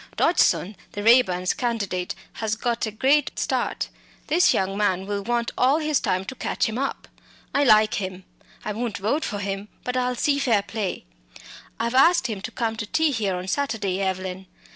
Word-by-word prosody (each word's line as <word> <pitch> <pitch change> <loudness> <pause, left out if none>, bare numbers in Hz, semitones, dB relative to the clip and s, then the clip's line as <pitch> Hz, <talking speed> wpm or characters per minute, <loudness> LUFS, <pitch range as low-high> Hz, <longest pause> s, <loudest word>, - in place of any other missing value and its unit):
Dodgson, 210 - +3 0.2
the 205 - -4
Raeburns' 190 -6 +4
candidate, 200 -7 -2 0.2
has 220 -1 -2
got 235 0 -1
a - - -4
great 270 +6 +2
start; - - -1 0.4
this 340 +3 +5
young 195 0 0
man 190 -2 +1
will 205 0 -2
want 235 +2 -1
all 265 +4 +3
his 305 -3 +1
time 185 +1 -1
to 230 - -6
catch - - -1
him 225 +2 -3
up. 275 - -3 0.5
I 285 - +3
like 215 -4 +4
him. 190 0 -5 0.4
I 210 - -2
won't 225 -1 -3
vote 225 +11 0
for 205 - -3
him; 200 0 -4 0.2
but 250 - -3
I'll 250 0 0
see 280 +3 +1
fair 230 -7 +2
play. 210 -4 -4 0.7
I've 235 +1 -1
asked 335 +7 +5
him 215 -5 -3
to - - -5
come 225 -2 -2
to 210 - -4
tea 315 +6 +2
here 210 -7 -1
on 180 +1 -5
Saturday, 200 -6 -1
Evelyn. 190 0 -3
220 Hz, 185 wpm, -24 LUFS, 195-255 Hz, 0.7 s, this